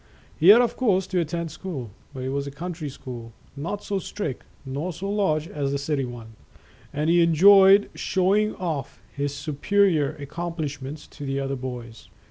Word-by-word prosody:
He 165 - +2
had 215 +5 +10
of 240 - -1
course 195 -7 +2
to 185 -1 -1
attend 170 0 -2
school, 140 - -6 0.2
but 130 -3 -7
it 130 - -2
was 140 +1 -2
a - - -3
country 160 +1 -5
school, 120 -4 -9 0.2
not 170 +8 -4
so 200 -1 -2
strict 190 -8 -5 0.2
nor 140 +7 -3
so 180 +4 -6
large 165 -7 +1
as 140 -3 -2
the 140 - 0
city 140 -1 -1
one, 115 -2 -9 0.6
and 150 +2 -1
he 170 +1 +5
enjoyed 195 +4 +7
show 185 0 +1
ing 215 0 +1
off 155 -7 -4 0.2
his 140 0 -1
superior 155 +2 +1
accomplishments 150 -2 -5
to 145 - -11
the 135 0 -2
other 135 0 -2
boys. 125 -3 -7
155 Hz, 175 wpm, -25 LUFS, 140-185 Hz, 0.6 s, had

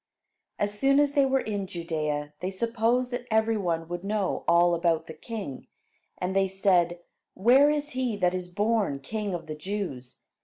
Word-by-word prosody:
As 205 0 -2
soon 275 +3 +4
as 290 -1 +3
they 280 -2 +4
were 265 0 +2
in 205 -3 -3
Judea, 155 -5 -3
they 180 - -2
supposed 230 +4 0
that 245 0 -4
every 220 +1 +2
one 170 -5 -1
would 175 +1 -5
know 205 -1 -1
all 175 +1 +5
about 165 -1 +1
the 160 - -8
king, 190 - -7 0.5
and 185 +1 -3
they 195 0 +3
said: 180 -3 +2 0.3
"Where 255 +8 +5
is 295 0 -1
he 255 -4 -1
that 180 -2 +2
is 180 -1 -4
born 205 -6 0
king 205 +5 -3
of 170 - -6
the 155 - -5
Jews? 150 -7 -5
195 Hz, 180 wpm, -27 LUFS, 170-230 Hz, 0.5 s, all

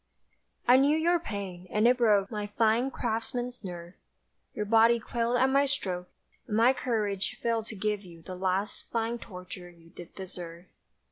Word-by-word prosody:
I 250 +1 +8
knew 285 +3 +4
your 340 +2 +3
pain, 195 - -6
and 215 +2 +3
it 250 +1 +4
broke 205 -4 +3
My 210 -2 -3
fine, 225 +4 +2
craftsman's 245 0 -3
nerve; 175 -2 -7 0.6
Your 210 - -2
body 230 +2 +5
quailed 235 +1 -1
at 255 - +4
my 275 +1 +3
stroke, 185 -10 -2 0.4
And 215 -2 -1
my 240 +3 +6
courage 210 -6 -1
failed 230 -1 -1
to 220 - -6
give 210 +1 -1
you 170 -3 -13
the 185 - -7
last 190 +2 -2
Fine 230 +1 -1
torture 180 -3 -9
you 165 -1 -19
did 175 -2 -12
deserve. 175 -2 -8
215 Hz, 165 wpm, -29 LUFS, 185-240 Hz, 0.6 s, I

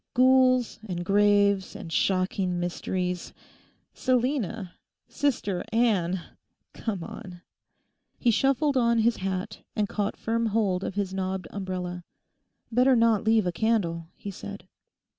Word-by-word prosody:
Ghouls 255 -2 +4
and 175 -1 -3
graves 200 -1 +3
and 165 - -7
shocking 185 -1 +1
mysteries—Selina! 190 +5 -3 0.3
Sister 235 -10 -1
Anne! 200 -6 +2 0.5
Come 200 -7 -4
on.' 190 -5 -9 0.7
He 240 - +3
shuffled 275 +4 +2
on 235 -1 +3
his 225 +1 +3
hat 190 0 -3 0.2
and 210 -1 +1
caught 205 0 -2
firm 230 0 0
hold 200 -4 +1
of 195 - -4
his 200 -2 -2
knobbed 190 0 -3
umbrella. 180 -2 -4 0.7
'Better 250 +3 +4
not 230 -3 +3
leave 220 -2 +3
a 180 - +1
candle,' 170 -5 0
he 200 - -7
said. 200 0 -9
205 Hz, 120 wpm, -27 LUFS, 185-230 Hz, 0.7 s, Ghouls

